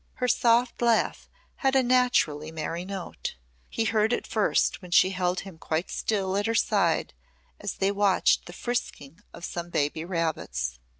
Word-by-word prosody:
Her 250 - -1
soft 240 +1 +2
laugh 235 -2 +1 0.3
had 270 -2 +1
a 265 - +5
naturally 240 -12 +2
merry 165 +2 -4
note. 190 - -6 0.3
He 225 - -1
heard 220 +1 +2
it - - -1
first 215 -1 +1
when 180 - -11
she 185 +2 +5
held 180 -1 -1
him 190 -5 -11
quite 160 +3 -2
still 195 -3 -1
at 205 +2 0
her 225 - 0
side - - +1 0.5
as 205 - -4
they 195 +1 +1
watched 200 -1 +2
the 175 - -9
frisking 180 - -4
of 170 - -8
some 175 0 -5
baby 150 0 -1
rabbits. 150 - -2
190 Hz, 165 wpm, -27 LUFS, 165-225 Hz, 0.5 s, a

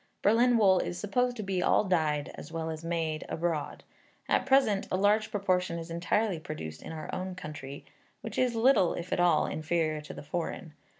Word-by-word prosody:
Berlin 235 +4 +4
wool 190 -4 +5
is 175 - -3
supposed 245 +4 0
to 215 - -4
be 190 -2 -1
all - - +3
dyed, 155 -6 0
as - - -10
well 160 -1 -3
as 160 0 -7
made, 165 -2 -2
abroad; 165 -3 -2 0.4
at - - +1
present 260 -7 +3
a 185 - +1
large 210 +2 +3
proportion 185 -4 0
is 165 0 -7
entirely 180 +2 0
produced 150 - -7
in - - -8
our 155 -1 -6
own 185 0 -4
country, 145 -5 -8 0.4
which - - -5
is 250 -2 +2
little, 225 -6 +4
if 175 +1 -4
at - - 0
all, 175 -3 +4
inferior 155 -1 -1
to 150 - -9
the - - -8
foreign. 165 +1 -4
175 Hz, 190 wpm, -29 LUFS, 160-205 Hz, 0.4 s, wool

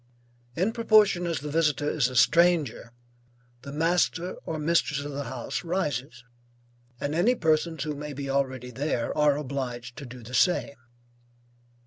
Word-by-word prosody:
In 190 +6 +1
proportion 215 -6 +4
as 165 -6 -2
the 150 0 -5
visitor 150 -2 +1
is 150 -5 +2
a 130 - -8
stranger, 155 -4 +3 0.7
the 140 +2 -8
master 170 +3 +1
or 160 - -2
mistress 150 -2 +1
of 145 +1 -6
the 140 0 -4
house 125 0 -4
rises, 150 -8 -3 0.8
and 145 - -2
any 210 +10 +3
persons 160 - +1
who 155 -2 -3
may 150 +1 -6
be 140 0 -5
already 130 -2 -1
there 130 -2 -2
are 150 -2 +3
obliged 125 -4 -5
to 140 -4 -8
do 125 -1 -11
the 120 +3 -11
same. 160 +2 +2
150 Hz, 150 wpm, -27 LUFS, 130-165 Hz, 0.8 s, proportion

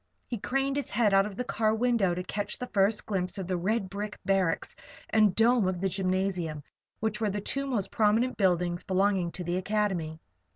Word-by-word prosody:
He 235 - -5
craned 270 +5 -1
his 285 - -2
head 215 -4 +2
out 195 +1 +5
of 205 - -8
the 250 - -2
car 220 -2 +1
window 225 -6 +2
to 180 - -3
catch 205 +3 -4
the 250 - -4
first 205 -1 +1
glimpse 190 -1 -2
of 190 - -3
the 185 +1 -1
red 195 +4 0
brick 205 +2 -5
barracks 190 -4 0 0.4
and 215 -4 +4
dome 230 -2 +4
of 185 -1 -1
the 195 +1 0
gymnasium, 185 -5 -1 0.4
which 220 +1 -1
were 215 - +2
the 205 +1 -2
two 275 +7 -1
most 210 -7 -1
prominent 225 +4 +2
buildings 175 -3 +1
belonging 190 -2 +1
to 180 - -5
the 175 +1 -1
Academy. 185 -5 -1
200 Hz, 200 wpm, -28 LUFS, 185-220 Hz, 0.4 s, out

